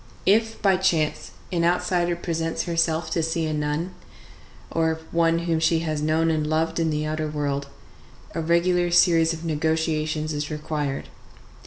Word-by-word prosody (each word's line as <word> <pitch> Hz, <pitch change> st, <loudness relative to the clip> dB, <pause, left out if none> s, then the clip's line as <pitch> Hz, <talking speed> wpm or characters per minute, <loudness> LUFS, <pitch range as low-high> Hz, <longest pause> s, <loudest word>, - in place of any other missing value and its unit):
If, 225 Hz, +3 st, +2 dB
by 195 Hz, -2 st, +4 dB
chance, 170 Hz, -5 st, 0 dB, 0.2 s
an 170 Hz, -2 st, 0 dB
outsider 175 Hz, 0 st, +1 dB
presents 165 Hz, -1 st, -2 dB
herself 165 Hz, -1 st, 0 dB
to 165 Hz, -, +1 dB
see 165 Hz, 0 st, -1 dB
a 155 Hz, -, -2 dB
nun, 150 Hz, +4 st, -2 dB, 0.8 s
or 160 Hz, -1 st, +1 dB
one 165 Hz, 0 st, +3 dB
whom 165 Hz, -2 st, +1 dB
she 160 Hz, 0 st, +2 dB
has 155 Hz, -2 st, -2 dB
known 160 Hz, +2 st, +2 dB
and 155 Hz, -1 st, 0 dB
loved 165 Hz, +2 st, 0 dB
in 165 Hz, -1 st, +1 dB
the 150 Hz, 0 st, -1 dB
outer 155 Hz, 0 st, -2 dB
world, 145 Hz, -2 st, -2 dB, 0.7 s
a 165 Hz, -, -2 dB
regular 175 Hz, +2 st, +2 dB
series 170 Hz, -2 st, +4 dB
of 165 Hz, 0 st, -6 dB
negotiations 155 Hz, 0 st, -1 dB
is 150 Hz, 0 st, -3 dB
required. 150 Hz, -2 st, -3 dB
160 Hz, 155 wpm, -24 LUFS, 155-170 Hz, 0.8 s, by